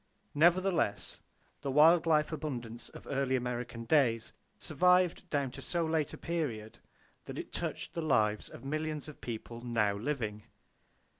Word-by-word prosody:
Nevertheless, 175 - +2 0.4
the 140 - -3
wild 160 +4 +6
life 155 -1 +3
abundance 125 -7 -5
of - - -12
early 135 -1 0
American 120 -2 -3
days 115 -5 +2 0.2
survived 180 +2 +2
down 140 -3 0
to 135 - -9
so 170 +3 0
late 160 -2 0
a - - -8
period 130 -11 -3 0.5
that - - -7
it - - -6
touched - - -3
the 165 - -2
lives 110 -9 +1
of - - -11
millions 155 +1 -2
of 150 - -11
people 115 0 -6
now 115 -4 +1
living. 110 -2 -3
140 Hz, 145 wpm, -32 LUFS, 115-160 Hz, 0.5 s, wild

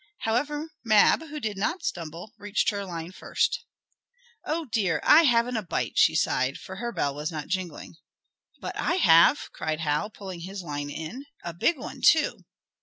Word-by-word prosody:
However, 295 +7 -1
Mab, 215 +5 +5
who 300 0 -6
did 210 -6 -3
not 330 - -1
stumble, 170 +4 -5
teached 205 +2 +1
her 200 -1 -4
line 170 -1 -6
first. - - -1 0.8
"Oh 325 +1 -2
dear! 200 - 0
I 320 +2 +7
haven't 240 -2 +3
a - - -1
bite!" 180 - -3
she - - +5
sighed, 130 +1 +1
for 190 - -9
her 235 +3 -3
bell 140 -10 -1
was 150 +3 -4
not 150 -2 -6
jingling. 180 -3 -4 0.6
"But - - -6
I 345 - +1
have!" 210 - +5
cried 155 0 -3
Hal, 150 +6 0
pulling 190 -4 -8
his 190 +2 -7
line 145 -3 -4
in. 170 - -7 0.2
"A 170 - -5
big 285 - +1
one, 275 - -8
too!" - - +3
195 Hz, 175 wpm, -26 LUFS, 165-245 Hz, 0.8 s, I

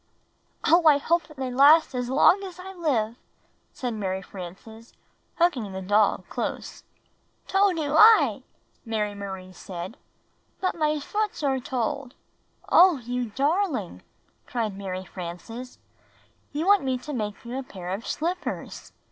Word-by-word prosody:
"Oh, 335 +1 +5
I 295 -2 +7
hope 335 +4 0
that 305 - -16
they 260 -1 -3
last 285 +5 +6
as 245 -1 -2
long 300 +8 +5
as 370 -3 -8
I 380 +1 -9
livel" 250 - -1 0.5
said 250 -2 -4
Mary 190 -3 -3
Frances, 200 +5 -11 0.4
hugging 260 - +1
the 190 - -5
doll 205 +2 +2
close. - - -5 0.6
"Toe 390 +1 +3
do 300 -4 -2
I!" 435 +7 +7 0.4
Mary 215 -3 -2
Marie 190 -2 -7
said. 180 +3 -8 0.6
"But 370 - 0
my 305 -2 0
foots 415 +3 -3
are 270 -2 +1
told." 255 0 -3 0.5
"Oh, 355 -3 +6
you 245 0 -3
darhng!" 275 - -1 0.5
cried 225 -5 -2
Mary 190 -1 -5
Frances. 190 +9 -8 0.7
"You 300 +3 -2
want 405 0 +5
me 260 -1 -1
to 295 +4 -7
make 210 -2 -4
you 245 +3 -4
a - - -3
pair 185 -8 -8
of 195 +5 -4
slippers!" 350 +4 -4
255 Hz, 140 wpm, -26 LUFS, 205-315 Hz, 0.7 s, I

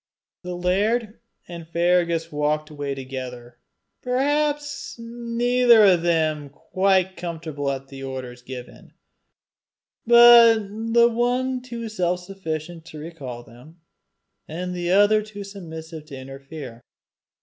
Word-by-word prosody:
The 180 -1 -6
laird 210 +5 0 0.3
and 170 -2 -9
Fergus 170 0 +1
had 165 - -20
walked 150 +1 -1
away 145 -2 -4
together, 125 -2 -8 0.4
perhaps 290 +3 -1
neither 235 0 +3
of 180 -4 +5
them 155 -4 0
quite 190 +5 0
comfortable 160 -5 -4
at 135 0 -5
the 135 -1 -10
orders 130 -2 -7
given, 125 0 -10 1.1
but 235 -1 +9 0.4
the 235 0 +6
one 250 +2 0
too 235 -2 -6
self 180 -4 -1
sufficient 170 -3 -6
to 155 - -11
recall 145 -7 -8
them, 125 +9 -17 0.7
and 180 +3 -5
the 175 -1 -3
other 205 +3 +5
too 210 -1 -9
submissive 160 -5 -9
to 140 -3 -9
interfere. 135 -2 -9
175 Hz, 115 wpm, -23 LUFS, 150-220 Hz, 1.1 s, but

